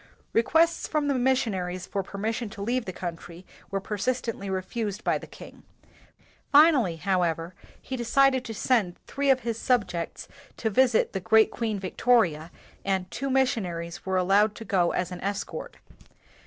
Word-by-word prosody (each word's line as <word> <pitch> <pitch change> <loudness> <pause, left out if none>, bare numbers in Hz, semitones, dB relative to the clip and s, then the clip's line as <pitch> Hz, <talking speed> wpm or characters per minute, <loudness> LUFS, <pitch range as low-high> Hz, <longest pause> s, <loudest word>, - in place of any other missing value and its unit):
Requests 325 +9 +3
from 300 -2 0
the 280 - +2
missionaries 210 -9 0
for 200 - -2
per 195 +1 -9
mission 220 +2 -2
to 200 0 -7
leave 245 +2 -1
the 185 - -4
country 175 0 -7 0.2
were 195 - -1
persist 215 +6 -2
ently 200 -4 -4
refused 205 +3 -3
by - - +1
the - - -11
king. - - -13 0.9
Finally, 285 - +6
how 185 +3 0
ever, 165 0 -1 0.3
he 260 - -6
decided 260 +2 +3
to 225 - -5
send 210 -7 +1
three 280 0 -1
of 260 -1 +4
his 230 -1 -3
own - - -9
subjects 200 -9 0 0.3
to 220 - -1
visit 245 +1 +3
the 195 - -1
great 220 +4 +4
Queen 225 -3 -2
Victoria 185 -5 +1 0.3
and 190 -2 -1
two 275 +1 -3
missionaries 190 -10 -1
were 190 0 0
allowed 200 +4 +3
to 225 - -9
go 180 -5 +2
as 180 0 -2
an 180 - -7
escort. 200 +1 -4
210 Hz, 170 wpm, -26 LUFS, 185-250 Hz, 0.9 s, Finally